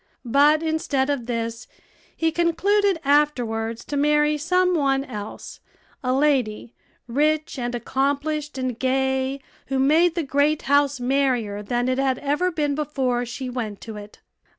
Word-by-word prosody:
But 290 Hz, +6 st, +4 dB
instead 290 Hz, -4 st, 0 dB
of 250 Hz, -5 st, -3 dB
this, 230 Hz, -1 st, -3 dB, 0.5 s
he 325 Hz, 0 st, +1 dB
concluded 375 Hz, +3 st, +2 dB
afterwards 240 Hz, -6 st, +1 dB
to 290 Hz, -, -4 dB
marry 300 Hz, +1 st, +3 dB
some 360 Hz, +4 st, +1 dB
one 275 Hz, -4 st, +1 dB
else 210 Hz, -4 st, -8 dB, 0.4 s
a 255 Hz, -, 0 dB
lady, 255 Hz, -5 st, +1 dB, 0.3 s
rich, 300 Hz, +4 st, 0 dB
and 240 Hz, 0 st, -2 dB
accomplished, 285 Hz, +4 st, -2 dB
and 255 Hz, -3 st, -3 dB
gay, 265 Hz, +1 st, 0 dB, 0.3 s
who 270 Hz, -, -1 dB
made 315 Hz, +6 st, +3 dB
the 340 Hz, -, 0 dB
great 285 Hz, +2 st, +1 dB
house 285 Hz, -1 st, +2 dB
merrier 245 Hz, -5 st, 0 dB
than 240 Hz, +4 st, -1 dB
it 255 Hz, +1 st, 0 dB
had 265 Hz, -2 st, +1 dB
ever 295 Hz, +6 st, 0 dB
been 300 Hz, -4 st, -1 dB
before 265 Hz, -5 st, -1 dB
she 255 Hz, +2 st, -5 dB
went 230 Hz, -5 st, -4 dB
to 220 Hz, -2 st, -8 dB
it. 205 Hz, 0 st, -11 dB
275 Hz, 145 wpm, -23 LUFS, 245-300 Hz, 0.5 s, But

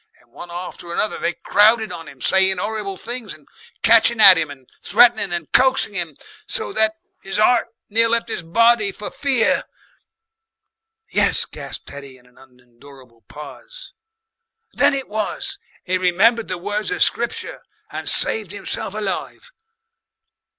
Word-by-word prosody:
And -, -, -29 dB
one 175 Hz, -, -11 dB
after 175 Hz, 0 st, -8 dB
another 210 Hz, +5 st, -2 dB
they 175 Hz, -, -1 dB
crowded 220 Hz, +2 st, +2 dB
on 165 Hz, -, -9 dB
'im 135 Hz, -2 st, -14 dB
saying 190 Hz, -1 st, +3 dB
'orrible 210 Hz, -1 st, -4 dB
things, 240 Hz, -1 st, -4 dB
and 150 Hz, -, -21 dB, 0.4 s
catchin' 230 Hz, +1 st, +5 dB
at 195 Hz, -3 st, +10 dB
'im 160 Hz, -3 st, -1 dB
and 135 Hz, -3 st, -13 dB
threatenin' 225 Hz, -1 st, +3 dB
and 170 Hz, -3 st, -5 dB
coaxing 260 Hz, -4 st, +2 dB
'im, 170 Hz, -6 st, -3 dB, 0.3 s
so 450 Hz, -3 st, -2 dB
that 220 Hz, 0 st, +2 dB, 0.3 s
'is 195 Hz, -, -5 dB
'eart 235 Hz, +3 st, +3 dB, 0.2 s
near 230 Hz, +2 st, +1 dB
left 230 Hz, 0 st, 0 dB
'is -, -, -1 dB
body 220 Hz, +4 st, +2 dB
for 205 Hz, -, -7 dB
fear." 265 Hz, -5 st, +1 dB, 1.5 s
"Yes," -, -, +3 dB
gasped -, -, -8 dB
Teddy 140 Hz, -2 st, -11 dB
in 125 Hz, -, -23 dB
an 125 Hz, 0 st, -24 dB
unendurable 125 Hz, -1 st, -19 dB
pause. -, -, -12 dB, 0.8 s
"Then 280 Hz, -, +2 dB
it 270 Hz, -1 st, -5 dB
was 215 Hz, 0 st, -3 dB, 0.2 s
he 185 Hz, 0 st, -1 dB
remembered 215 Hz, +6 st, +2 dB
the 185 Hz, -, -4 dB
words 205 Hz, +4 st, -4 dB
of 405 Hz, -, +2 dB
Scripture -, -, -2 dB, 0.3 s
and -, -, -4 dB
saved 215 Hz, -5 st, +2 dB
himself 205 Hz, 0 st, -5 dB
alive. 215 Hz, -, -5 dB
200 Hz, 145 wpm, -19 LUFS, 170-230 Hz, 1.5 s, at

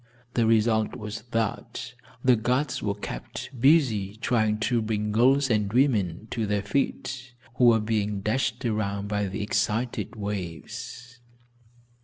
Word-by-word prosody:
The 115 Hz, -2 st, +2 dB
result 110 Hz, 0 st, +3 dB
was 110 Hz, -2 st, -6 dB
that 115 Hz, -3 st, -3 dB, 0.3 s
the 130 Hz, -1 st, +6 dB
guards 125 Hz, +5 st, 0 dB
were 100 Hz, -1 st, -1 dB
kept 105 Hz, -, -6 dB
busy 120 Hz, -9 st, +4 dB
trying 110 Hz, -2 st, +1 dB
to 120 Hz, +1 st, +2 dB
bring 105 Hz, -1 st, -1 dB
girls 130 Hz, +4 st, +4 dB
and 105 Hz, -2 st, +1 dB
women 110 Hz, -, +1 dB
to 110 Hz, -3 st, -1 dB
their 100 Hz, -1 st, 0 dB
feet, 130 Hz, +2 st, -2 dB, 0.2 s
who 125 Hz, -, +5 dB
were 115 Hz, -2 st, +6 dB
being 105 Hz, -2 st, -1 dB
dashed 120 Hz, +3 st, -1 dB
around 100 Hz, -3 st, -1 dB
by 105 Hz, -1 st, 0 dB
the 100 Hz, +2 st, -3 dB
excited 115 Hz, +4 st, -1 dB
waves. 105 Hz, +4 st, -6 dB
110 Hz, 135 wpm, -26 LUFS, 105-120 Hz, 0.3 s, the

